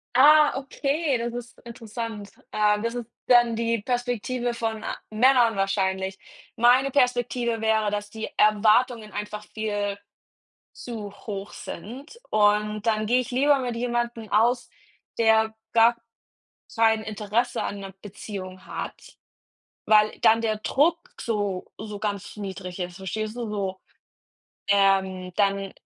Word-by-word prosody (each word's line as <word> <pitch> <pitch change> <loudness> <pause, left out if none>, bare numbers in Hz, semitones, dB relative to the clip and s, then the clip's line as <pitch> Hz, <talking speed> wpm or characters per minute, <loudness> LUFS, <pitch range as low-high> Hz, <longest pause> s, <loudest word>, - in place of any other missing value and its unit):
Ah, 300 +3 +7
okay, 280 +1 -1
das 235 0 -3
ist 240 0 -8
interessant. 225 -3 -7 0.2
Äh, 210 -1 +2
das 230 +1 -2
ist 240 -2 -5 0.2
dann 240 -2 +5
die 230 -1 0
Perspektive 245 0 -2
von, 225 -2 -3
äh, - - -6 0.2
Männern 240 0 +4
wahrscheinlich. 190 -1 -1 0.4
Meine 250 +4 +4
Perspektive 245 -3 +1
wäre, 220 -1 +2
dass 205 0 -3
die 220 +1 -5
Erwartungen 215 +2 +3
einfach 210 +1 -6
viel 205 -2 -2 0.8
zu 220 -4 -7
hoch 200 -1 -7
sind 270 - -9
und 210 0 +2
dann 215 -1 +1
gehe 245 +4 +3
ich 250 - -3
lieber 275 +3 +3
mit 245 -2 -3
jemandem 240 -2 -2
aus, 240 +3 +2 0.5
der 220 -1 +4 0.2
gar 230 +1 +5 0.8
kein 225 -1 +3
Interesse 215 +3 -1
an 200 - -4
'ner 195 -1 -8
Beziehung 190 -2 -8
hat, - - -7 0.7
weil 215 0 +4
dann 225 +1 +5
der 220 -2 0
Druck 300 +10 +2 0.2
so 205 -5 -2
so 210 -1 -7
ganz 205 -1 -4
niedrig 190 -2 -6
ist, 180 -1 -4
verstehst 215 +3 -4
du? 240 -3 -4
So, 195 -2 -3 0.9
ähm, 190 -2 +2
dann 195 -1 +1
220 Hz, 130 wpm, -25 LUFS, 205-240 Hz, 0.9 s, Ah